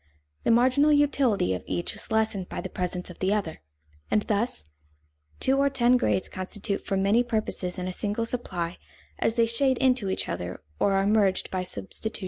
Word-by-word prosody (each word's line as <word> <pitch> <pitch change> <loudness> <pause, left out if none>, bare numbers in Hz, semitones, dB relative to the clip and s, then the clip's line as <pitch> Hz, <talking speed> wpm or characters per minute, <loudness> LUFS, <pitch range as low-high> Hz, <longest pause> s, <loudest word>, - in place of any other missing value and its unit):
The - - +2
marginal 255 +6 +4
utility 275 - +2
of 90 - -4
each 175 - -2
is - - -4
lessened 220 -4 0
by - - -5
the 185 - -6
presence 180 0 -4
of - - -14
the 190 +2 +1
other. 190 -7 -3 0.5
And 210 - +2
thus, 210 - -1 0.7
two 265 +1 +2
or 280 0 +4
ten 245 -2 +3
grades 240 -6 +1
constitute 195 +2 -3
for 195 - -1
many 200 +5 +3
purposes 215 -6 -2
a 185 0 -3
single 210 +4 -2
supply 180 -8 -2 0.4
as 225 - +1
they 230 -1 +4
shade 260 +3 +1
into 255 -6 +2
each 190 - 0
other 90 +1 -5 0.2
or 200 - +2
are 195 0 +2
merged 205 -2 +2
by 185 - -1
substitution. 180 - -2
210 Hz, 180 wpm, -26 LUFS, 185-240 Hz, 0.7 s, marginal